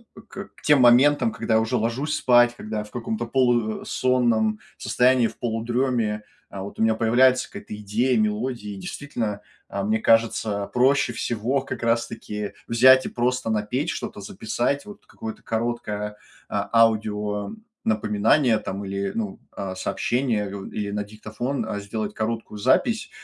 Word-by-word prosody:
э, -, -, -11 dB
к 195 Hz, 0 st, -10 dB
тем 145 Hz, -3 st, +5 dB
моментам, 145 Hz, -, +5 dB
когда 110 Hz, -, -1 dB
я -, -, +5 dB
уже 115 Hz, +3 st, 0 dB
ложусь 130 Hz, +7 st, -1 dB
спать, 120 Hz, -1 st, +4 dB
когда 110 Hz, -2 st, -5 dB
я -, -, -3 dB
в 105 Hz, -, -15 dB
каком-то 215 Hz, -, -3 dB
полу 120 Hz, -4 st, +1 dB
э, -, -, -13 dB
сонном 115 Hz, -4 st, +1 dB, 0.2 s
состоянии, 125 Hz, -1 st, +3 dB
в -, -, -11 dB
полудреме, 115 Hz, -2 st, -1 dB, 0.3 s
а, 95 Hz, -, -7 dB
вот 100 Hz, -, -9 dB
у -, -, +3 dB
меня 110 Hz, 0 st, +3 dB
появляется 125 Hz, +3 st, +3 dB
какая-то 105 Hz, -, -8 dB
идея, 110 Hz, +5 st, 0 dB
мелодия, 105 Hz, 0 st, -1 dB
и -, -, -8 dB
действительно, 110 Hz, -2 st, -4 dB, 0.3 s
а, 100 Hz, 0 st, -3 dB
мне 110 Hz, +2 st, +1 dB
кажется, 110 Hz, -3 st, +2 dB
проще 130 Hz, 0 st, +3 dB
всего, 120 Hz, +4 st, -1 dB
как 130 Hz, -3 st, -6 dB
раз 115 Hz, 0 st, +2 dB
таки, 105 Hz, -2 st, -6 dB
взять 130 Hz, +3 st, +6 dB
и -, -, -3 dB
просто 125 Hz, -1 st, -1 dB
напеть 110 Hz, +8 st, -1 dB
что-то, -, -, -5 dB
записать, 120 Hz, -, -2 dB
вот 205 Hz, 0 st, -12 dB
какое-то 220 Hz, -1 st, -8 dB
короткое, 110 Hz, -2 st, -3 dB, 0.3 s
а, -, -, -2 dB
аудио 105 Hz, -, +2 dB, 0.3 s
напоминание 110 Hz, +4 st, +2 dB
там, 100 Hz, -1 st, -5 dB
или, 100 Hz, 0 st, -2 dB
ну, 105 Hz, -4 st, -4 dB
а, 95 Hz, -1 st, -5 dB
сообщение, 110 Hz, 0 st, -1 dB
у 95 Hz, -, -7 dB
или 100 Hz, -1 st, -4 dB
на 105 Hz, 0 st, -2 dB
диктофон, 110 Hz, +5 st, -4 dB
а, 105 Hz, -, -3 dB
сделать 105 Hz, +1 st, -4 dB
короткую 115 Hz, -1 st, -3 dB
запись, 100 Hz, -, +2 dB
115 Hz, 160 wpm, -24 LUFS, 105-125 Hz, 0.3 s, взять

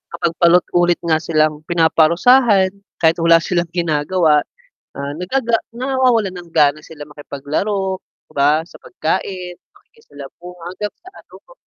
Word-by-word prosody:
kapag 170 Hz, -, -1 dB
paulit 175 Hz, 0 st, +5 dB
ulit 175 Hz, 0 st, +3 dB
nga 160 Hz, -2 st, +1 dB
silang 155 Hz, -2 st, 0 dB
pinaparusahan 185 Hz, +6 st, +3 dB, 0.3 s
kahit 160 Hz, +2 st, +4 dB
wala 165 Hz, 0 st, +5 dB
silang 175 Hz, -1 st, -1 dB
ginagawa, 160 Hz, -1 st, +1 dB, 0.6 s
ah, 140 Hz, +1 st, -4 dB
nagaga 230 Hz, +6 st, 0 dB, 0.2 s
nawawalan 245 Hz, -5 st, 0 dB
ng 175 Hz, -1 st, -11 dB
gana 150 Hz, 0 st, +3 dB
sila 150 Hz, -2 st, -11 dB
makipaglaro, 155 Hz, +7 st, -3 dB, 0.3 s
'di -, -, -21 dB
ba 145 Hz, +2 st, +3 dB
sa -, -, -15 dB
pagkain, 180 Hz, +1 st, -4 dB, 0.2 s
pakikisalamuha, 175 Hz, -, -14 dB
hanggang 205 Hz, +3 st, -5 dB
sa 370 Hz, -, -15 dB
ano -, -, -16 dB
ku. -, -, -17 dB
175 Hz, 135 wpm, -18 LUFS, 155-190 Hz, 0.6 s, paulit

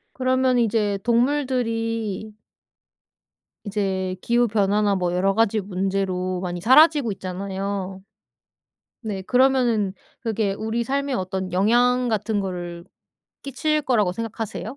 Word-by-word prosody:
그러면 255 Hz, 0 st, +2 dB
이제 210 Hz, -3 st, +1 dB
동물들이 230 Hz, -4 st, 0 dB, 1.3 s
이제 190 Hz, -2 st, -2 dB
기후변화나 210 Hz, -4 st, +2 dB
뭐 180 Hz, -1 st, -1 dB
여러 195 Hz, +2 st, +2 dB
가지 225 Hz, -1 st, +2 dB
문제로 185 Hz, -1 st, -2 dB
많이 175 Hz, -1 st, -4 dB
사라지고 280 Hz, -, +5 dB
있잖아요. 190 Hz, 0 st, -5 dB, 1.0 s
네 210 Hz, -5 st, -4 dB
그러면은 245 Hz, -4 st, +2 dB, 0.3 s
그게 220 Hz, -3 st, -1 dB
우리 220 Hz, +3 st, -2 dB
삶에 280 Hz, +1 st, -1 dB
어떤 185 Hz, -2 st, -3 dB
영향 245 Hz, +6 st, +3 dB
같은 215 Hz, -1 st, -1 dB
거를 175 Hz, -3 st, -5 dB, 0.6 s
끼칠 305 Hz, +3 st, -1 dB
거라고 215 Hz, -9 st, +2 dB
생각하세요? 225 Hz, +3 st, -5 dB
215 Hz, 255 characters per minute, -23 LUFS, 190-240 Hz, 1.3 s, 사라지고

